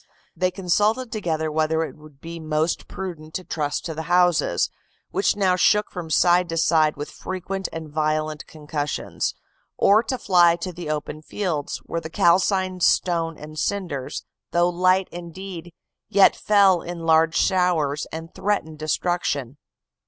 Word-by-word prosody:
They 185 0 +1
consulted 210 +7 0
together 160 -7 -2
whether 160 +1 +1
it - - -6
would 150 -2 -17
be 165 0 -7
most 155 +1 -1
prudent 165 -5 -7
to 185 - -3
trust 150 -4 -3
to 165 - -3
the 160 - -4
houses, 175 - +3 0.4
which 195 - +1
now 190 -3 +2
shook 210 +3 +3
from 175 -3 -6
side 175 +2 +4
to 165 - -3
side 155 -2 +3
with 145 - -6
frequent 190 +1 -5
and 165 -1 -6
violent 155 0 -1
concussions; 150 -1 -3 0.4
or 205 +2 +5
to 255 +3 -3
fly 175 -6 +4
to 175 +1 -5
the 170 -2 -7
open 155 0 -4
fields, 160 -4 -3
where 165 - -3
the 160 - -7
calcined 185 +2 +2
stone 165 -2 +2
and 155 +1 -8
cinders, 170 -11 -3 0.2
though 175 0 +2
light 185 +1 +2
indeed, 175 0 -8 0.4
yet 195 0 +5
fell 195 -4 +4
in 175 -1 -6
large 160 0 +4
showers 175 -6 +1
and 165 +1 -7
threatened 160 -7 -2
destruction. 155 -4 -1
170 Hz, 150 wpm, -23 LUFS, 155-185 Hz, 0.4 s, or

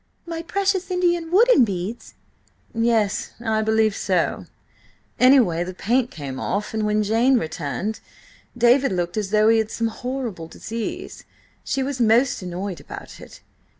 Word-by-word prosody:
"My 330 -1 -5
precious 385 +2 -1
Indian 345 -2 0
wooden 410 - +5
beads!" 205 +2 -4 0.6
"Yes–I 225 0 0
believe 220 -1 +2
so. 180 -4 -1 0.7
Anyway, 245 -11 +5
the 180 +1 -7
paint 245 +5 +1
came 135 -4 -7
off, 205 +10 -2
and 215 -1 0
when 210 0 +1
Jane 230 +5 +3
returned, 170 +4 -3 0.6
David 245 +2 +4
looked 175 -1 -2
as 210 -3 -2
though 215 +1 +3
he 225 0 +5
had 220 -1 -1
some 230 0 -1
horrible 235 -8 -5
disease. 225 +6 -6 0.4
She 270 - -1
was 265 -2 -3
most 235 +3 +3
annoyed 185 +1 -5
about - - -10
it." - - -13
220 Hz, 140 wpm, -22 LUFS, 195-260 Hz, 0.7 s, wooden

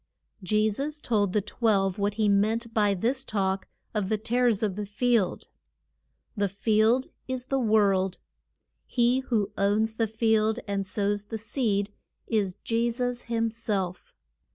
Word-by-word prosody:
Je 215 +3 +2
sus 285 +8 -3
told 210 -8 +1
the 210 - +1
twelve 200 -3 +1
what 200 0 0
he 215 -1 +2
meant 220 +3 +1
by 205 -2 +3
this 250 +8 0
talk 195 -4 -1 0.3
of 205 -3 -1
the 215 - +1
tares 230 0 +1
of 200 -4 0
the 205 0 -4
field. 225 -2 +1 0.9
The 205 -2 +1
field 220 +5 +2 0.2
is 260 -1 -2
the 270 +1 0
world. 200 -5 +2 0.7
He 245 +1 +2
who 230 -6 -1
owns 215 +3 +1
the 225 - +1
field 220 0 +2
and 200 -1 -2
sows 205 +1 0
the 225 - -5
seed, 210 -2 -1 0.3
is 200 -5 0
Je 230 +1 +1
sus 245 0 -2
him 230 -1 0
self. 195 -5 -3
215 Hz, 150 wpm, -27 LUFS, 200-230 Hz, 0.9 s, by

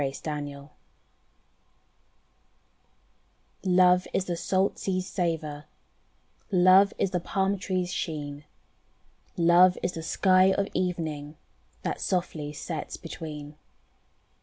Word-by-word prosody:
"Love's 135 -1 -2
Horizon" 145 -2 -5 2.9
Love 180 -1 +4
is 190 - +1
the 175 - -2
salt 190 +3 0
sea's 185 -1 -1
savour, 160 -6 -3 0.9
Love 185 +2 +6
is 195 - 0
the 180 - 0
palm 195 +3 0
tree's 185 -1 -2
sheen, 145 -4 -4 0.9
Love 175 +2 +5
is 175 - 0
the 165 - -6
sky 185 +3 +4
of 200 0 0
evening. 160 -5 -3 0.5
That - - -3
softly 170 -5 -2
sets 155 +1 -5
between. 150 -3 -8
175 Hz, 100 wpm, -27 LUFS, 150-185 Hz, 2.9 s, Love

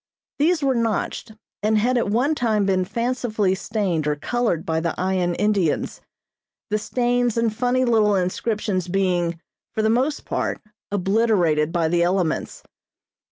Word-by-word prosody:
These 315 +1 +2
were 270 -1 +3
notched, 230 -1 -2 0.3
and 215 +1 +2
had 245 +4 +2
at 235 -4 +1
one 250 +8 +2
time 220 -7 +1
been 185 -1 +1
fancifully 230 -3 -1
stained 190 -6 -1
or 150 - +1
colored 200 +1 -1
by 160 0 0
the 165 0 -2
Ayan 180 -1 0
Indians, 200 -6 0 0.7
the 215 - +1
stains 245 0 0
and 230 -2 +1
funny 250 +2 +1
little 215 -4 +3
inscriptions 190 0 -1
being, 175 -3 0 0.4
for 220 - 0
the 220 - +3
most 265 +6 0
part, - - -2 0.3
obliterated 190 -6 +2
by 170 -2 +1
the 170 +1 +1
elements. 175 -2 -1
210 Hz, 145 wpm, -22 LUFS, 180-235 Hz, 0.7 s, were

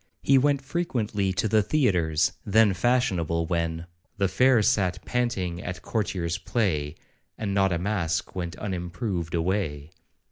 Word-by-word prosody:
He 135 -1 +5
went 140 0 +1
frequently 115 - -1
to 100 +4 0
the 110 0 +3
theatres, 95 - +1
then 105 0 +4
fashionable, 90 -8 +1
when 85 0 -2 0.3
'The 100 -1 +1
fair 120 +3 +4
sat 95 -4 +1
panting 95 -8 -1
at 90 0 -5
a - - -15
courtier's 90 -6 -2
play, 80 -11 -1 0.4
And 100 -3 -2
not 95 -1 +3
a 85 - +1
mask 90 -1 -1
went 85 -2 -4
unimproved 90 -2 -3
away.' 80 -4 -1
95 Hz, 140 wpm, -26 LUFS, 85-110 Hz, 0.4 s, He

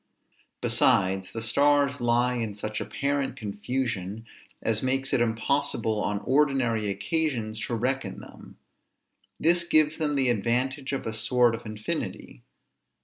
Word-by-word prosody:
Besides, 95 0 +2
the 115 - -5
stars 140 +3 +3
lie 120 +1 +2
in 115 -4 -3
such 105 +1 -4
apparent 140 -2 -2
confusion, 110 -2 -3 0.3
as 110 -1 0
makes 135 +1 0
it 120 - +3
impossible 110 -1 0
on 105 0 -1
ordinary 130 -6 +1
occasions 115 -3 -1
to 120 - -2
reckon 125 -3 -2
them. - - -13 0.8
This 170 +2 +4
gives 155 -2 +3
them 150 -2 0
the 135 -2 +2
advantage 125 +5 -1
of 135 - -3
a 110 - -3
sort 120 +2 +3
of 115 0 -6
infinity. 110 - -5
120 Hz, 130 wpm, -27 LUFS, 110-140 Hz, 0.8 s, This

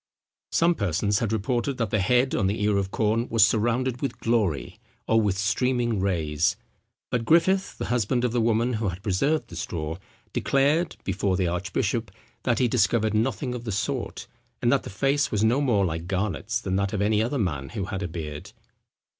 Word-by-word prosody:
Some 170 +1 +3
persons 100 - 0
had 115 -3 -1
reported, 120 +4 -1
that 115 -4 -1
the 105 - +2
head 125 +7 +2
on 100 - +1
the 105 +1 -1
ear 105 -1 +2
of 95 -1 -1
corn 110 +3 0
was 110 -3 +6
surrounded 120 +3 0
with 140 - -2
glory, 100 - 0 0.3
or 115 0 +4
with 100 -3 0
streaming 120 +1 +1
rays; 80 -5 +1 0.6
but 120 -2 0
Griffith, 185 +8 +3
the - - -3
husband 120 +1 +1
of 125 - 0
the 120 0 +1
woman 115 +2 +2
who 110 -1 -1
had 90 +2 -7
preserved 135 +10 0
the 85 - -9
straw, 80 -1 -4 0.4
declared, 145 +5 +1
before 95 -2 0
the 95 - +1
archbishop, 95 +5 -1 0.3
that 120 -3 +1
he 125 - +3
discovered 110 -2 +2
nothing 125 +3 0
of 120 -1 -5
the 115 - -4
sort, 95 - -3 0.3
and - - +2
that - - +3
the - - -8
face 135 +8 +1
was 105 0 +1
no 120 +6 +3
more 110 -8 +2
like 80 0 -3
Garnet's 100 +4 -1
than 95 -5 -1
that 100 +1 -1
of 105 - -1
any 105 0 +2
other 120 +6 -1
man 75 - -2
who 105 -4 -4
had 95 0 -4
a 90 - -2
beard. 75 -3 -7
110 Hz, 195 wpm, -25 LUFS, 95-125 Hz, 0.6 s, was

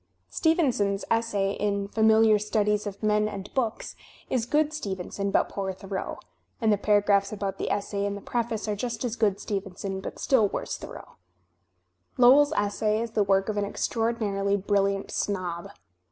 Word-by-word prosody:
Stevenson's 250 - +1
essay 205 -4 +1
in 200 -1 -1
"Familiar 220 0 +4
Studies 210 0 0
of 200 +1 -7
Men 210 0 +2
and 200 -1 -8
Books" 235 -4 -2 0.4
is 240 -3 0
good 300 +2 +2
Stevenson 200 - -3
but - - +2
poor 195 -1 -3
Thoreau; 190 0 -5 0.4
and 220 -4 +3
the - - +2
paragraphs 205 -1 +3
about 200 -2 -4
the - - -2
essay 200 0 -1
in 200 - -3
the - - -6
preface 230 -2 -2
are 210 - 0
just 240 +4 -3
as 235 -2 -2
good 205 -4 +1
Stevenson 195 -1 -4
but - - -7
still 240 -6 +3
worse - - -4
Thoreau. - - -10 1.0
Lowell's 275 +4 +6
Essay 210 -1 0
is 230 0 -3
the 220 - +1
work 195 0 +2
of 215 -1 -2
an 205 - +1
extraordinarily 205 -2 -1
brilliant 200 0 0
snob. 180 -4 -3
205 Hz, 160 wpm, -27 LUFS, 200-225 Hz, 1.0 s, Lowell's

